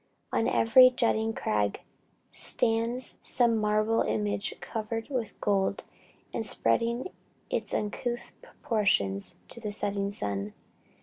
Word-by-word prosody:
"On 225 - +2
every 255 +3 +7
jutting 225 -3 +1
crag 105 - -1 0.5
stands 230 +2 0
some 240 -2 +3
marble 215 +1 +2
image 205 -1 -1
covered 225 +1 -4
with 240 -6 -3
gold, 200 -1 0 0.5
and - - -2
spreading 235 +7 +1 0.4
its - - -1
uncouth 240 +3 -3
proportions 195 - 0
to - - -6
the 215 -2 -4
setting 200 -1 -2
sun. 100 - -3
220 Hz, 110 wpm, -28 LUFS, 200-235 Hz, 0.5 s, every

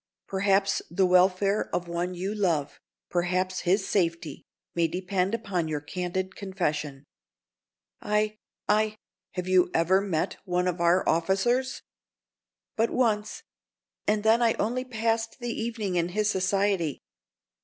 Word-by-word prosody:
Perhaps 195 0 +2
the 185 +3 +2
welfare 185 +3 +3
of 175 - -2
one 175 +1 -2
you 190 +4 -3
love—perhaps 175 - -1
his 190 +2 +1
safety, 170 -6 -1 0.3
may 170 -1 +2
depend 185 +4 -1
upon 195 -7 -2
your 155 -1 -2
candid 180 +5 -4
confession." 150 -8 -3 1.0
"I—I—" 215 0 -1 0.4
"Have 180 -1 -4
you 185 -1 +4
ever 185 +4 +4
met 180 -6 -1
one 180 -1 0
of 175 -1 -1
our 170 +2 +3
officers?" 195 +10 +1 0.9
"But 225 +1 +2
once. 215 -4 0 0.6
And 210 0 +2
then 225 +2 +4
I 230 -1 +4
only 245 +4 -1
passed 225 -1 -1
the 240 -1 -3
evening 225 -5 -2
in 170 0 +1
his 210 +3 +1
society. 190 -4 0
190 Hz, 125 wpm, -27 LUFS, 175-210 Hz, 1.0 s, you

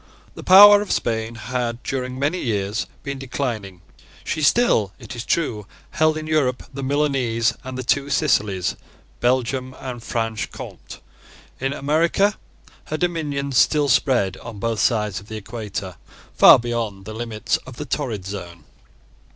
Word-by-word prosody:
The - - -9
power 205 +2 +9
of 205 - -4
Spain 115 0 -1
had, 120 +1 -3
during 130 -1 -3
many 145 +7 0
years, 105 -2 -2 0.2
been 140 -1 -5
declining. 115 -9 -4 0.4
She 155 - -3
still, 145 - +3
it 135 - -9
is 120 - -5
true 115 -12 -1 0.2
held 155 0 +2
in 155 - -5
Europe 145 -5 0
the 140 - -5
Milanese 130 -5 +1
and 130 0 -6
the 130 - -4
two 140 +3 +1
Sicilies, 105 - +1 0.4
Belgium, 130 +1 0
and 125 -3 -6
Franche 115 -2 -3
Comte. - - -10 0.6
In 135 +1 -1
America 165 +9 +1 0.5
her 155 - -3
dominions 145 -6 -1
still 150 -2 +3
spread, 125 -6 +2
on 110 - -9
both 115 +1 -2
sides 105 -5 +1
of 100 - -16
the 110 - -6
equator, 105 -4 -6 0.4
far - - +9
beyond 115 -5 -3
the 110 - -7
limits 110 -1 -2
of 130 - -12
the 150 - -6
torrid 120 -8 -3
zone. 90 -4 -7
125 Hz, 150 wpm, -22 LUFS, 110-140 Hz, 0.6 s, power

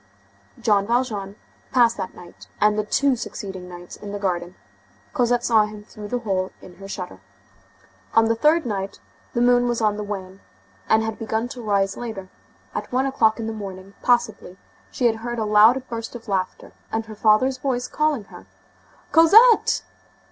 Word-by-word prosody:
Jean 205 -4 +2
Valjean 220 -5 -1 0.4
passed 235 -2 +4
that 190 -2 -5
night 175 - -14
and 210 0 +4
the 215 - 0
two 270 +5 +2
succeeding 190 -6 -7
nights 175 0 -10
in 205 -1 -8
the 205 - -3
garden. 180 -2 -2 0.6
Cosette 245 -3 +2
saw 220 -3 +4
him 210 -1 -10
through 210 -1 -10
the 245 - -1
hole 190 -5 -2
in 180 - -14
her 195 +1 -10
shutter. 180 - -6 1.0
On 225 0 +6
the 225 - +2
third 305 +7 +3
night, 195 -3 -4 0.4
the 240 - +2
moon 245 0 +4
was 240 -1 0
on 210 -2 +1
the 210 - -3
wane, 195 -2 -6 0.5
and 220 0 +4
had 225 -1 -4
begun 225 +1 -2
to 250 -2 -8
rise 200 -3 0
later; 220 -6 -6 0.4
at - - -5
one 255 +2 +1
o'clock 230 -5 +2
in 225 - -3
the 225 - -3
morning, 195 -2 -8
possibly, 235 -6 0 0.3
she 240 -3 +1
heard 240 +2 -5
a 220 - -1
loud 220 +5 +5
burst 230 0 -6
of 235 -1 -10
laughter 190 -2 -3 0.2
and 225 0 -2
her 220 - -9
father's 225 +5 +3
voice 255 -2 -1
calling 300 -6 0
her:— - - -14 0.6
"Cosette!" 435 +9 +6
220 Hz, 175 wpm, -23 LUFS, 200-245 Hz, 1.0 s, On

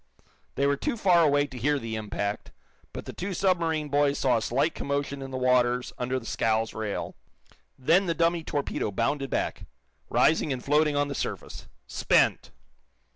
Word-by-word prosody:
They 140 - +1
were 140 0 +2
too 235 - -2
far 180 -5 +4
away 145 -1 +3
to 130 -3 -9
hear 145 +4 +2
the 115 -4 -4
impact, 105 -1 -4 0.4
but - - -7
the - - -7
two 190 +1 -4
submarine 165 -5 +1
boys 145 0 +2
saw 125 -3 +2
a - - -2
slight 135 +8 +1
commotion 140 0 -3
in 135 - -6
the 130 - -4
waters 125 -1 +2
under 125 +1 -1
the 115 - -14
scow's 110 0 0
rail. 110 -2 -4 0.6
Then 175 +9 +3
the 165 - 0
dummy 170 0 +1
torpedo 145 -7 -2
bounded 135 +7 -1
back, - - -2 0.4
rising 155 -1 +3
and 125 -2 -4
floating 150 +1 +3
on 145 0 +1
the 140 - -4
surface - - -5 0.2
spent! - - +2
140 Hz, 175 wpm, -27 LUFS, 125-155 Hz, 0.6 s, far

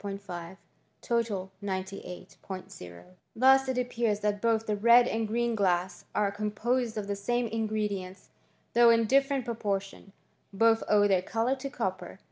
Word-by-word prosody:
5*5 190 -3 -7 1.0
98 190 -2 -6
Ot 90 - -9 0.3
Thus 265 +2 +5
it 260 - -1
appears 235 -4 -1
that 205 -1 -1
both 225 -1 +1
the 210 - -1
red 235 +3 +6
and 225 -2 -1
green 235 +2 0
glass 185 -3 0
are 205 -1 +1
composed 220 +3 -2
of 210 - -3
the 200 0 -3
same 240 +5 -1
ingredients, 210 -4 -3 0.4
though 235 0 +6
in 230 0 +4
different 275 +1 +2
proportions. 200 -4 -4 0.4
Both 225 +3 +3
owe 205 -1 +5
their 190 -2 +2
colour 230 +7 -1
to 275 +1 -5
copper. 190 -7 -4
210 Hz, 140 wpm, -29 LUFS, 195-235 Hz, 1.0 s, red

